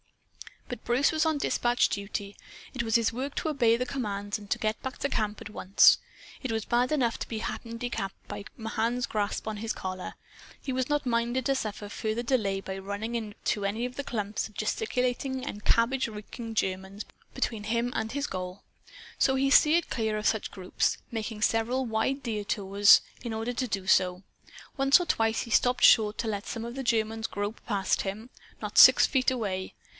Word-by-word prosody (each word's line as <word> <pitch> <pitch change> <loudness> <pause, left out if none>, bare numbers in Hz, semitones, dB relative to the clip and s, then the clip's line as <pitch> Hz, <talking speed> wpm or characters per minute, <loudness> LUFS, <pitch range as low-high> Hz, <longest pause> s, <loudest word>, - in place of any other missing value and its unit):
But - - -7
Bruce 245 +4 +2
was 315 0 +1
on 315 -2 +1
dispatch 245 -3 +2
duty. 200 0 -4 0.4
It 255 - -2
was 225 -1 0
his 230 -1 +3
work 265 +4 -4
to 315 - -1
obey 235 -6 +3
commands 210 -5 -3
and 205 -1 -13
to - - +1
get 215 0 -2
back 260 0 -5
to 280 - -1
camp 215 -4 -2
at - - -8
once. 195 -2 +5 0.4
It 260 - -3
was 220 -1 -2
bad 245 +2 +1
enough 250 -6 +1
to - - -4
be 225 - -4
handicapped 230 -3 -4
by 200 - -6
Mahan's 230 +2 -1
grasp 210 0 -2
on 215 -1 -3
his 220 +1 -3
collar. 185 -1 -6 0.4
He 265 - -4
was 255 +1 -1
not 295 -1 0
minded 240 +1 0
to 275 - +2
suffer 215 -4 -4
further 220 +3 -3
delay 210 -6 0
by 190 0 -6
running 205 +4 -4
into 210 -2 -3
any 220 +4 -1
of 250 0 -6
the 280 - -4
clumps 210 -5 -3
of 210 - -21
gesticulating 260 - -1
and 210 -7 -7
cabbage 250 +3 +2
reeking 225 +1 -8
Germans 190 +1 -2 0.3
between 215 -3 -2
him 235 +2 0
and 220 +1 -2
his 285 0 -1
goal. 185 -2 -6 0.6
So 265 - +3
he 270 +1 +1
steered 315 +4 +5
clear 220 -3 -1
of 210 - -4
such 220 -1 +1
groups, 185 -1 -1
making 220 -1 -4
several 235 +4 +1
wide 240 +5 -1
detours 205 -2 +4 0.2
in 235 -2 -4
order 225 +2 -2
to 255 +1 -2
do 195 -4 -3
so. 185 0 +3 0.5
Once 275 +4 +6
or 355 - -2
twice 225 -7 +1
he 230 - -7
stopped 245 +1 +3
short 215 -2 +6
to 230 - -1
let 205 -2 -3
some 225 0 -4
of 235 - -6
the 270 - -3
Germans 225 -1 0
grope 205 +2 -4
past 200 -4 +1
him, 215 +5 -5 0.3
not - - +1
six - - +9
feet 260 -2 +2
away. 200 -7 -3
225 Hz, 190 wpm, -28 LUFS, 205-250 Hz, 0.6 s, six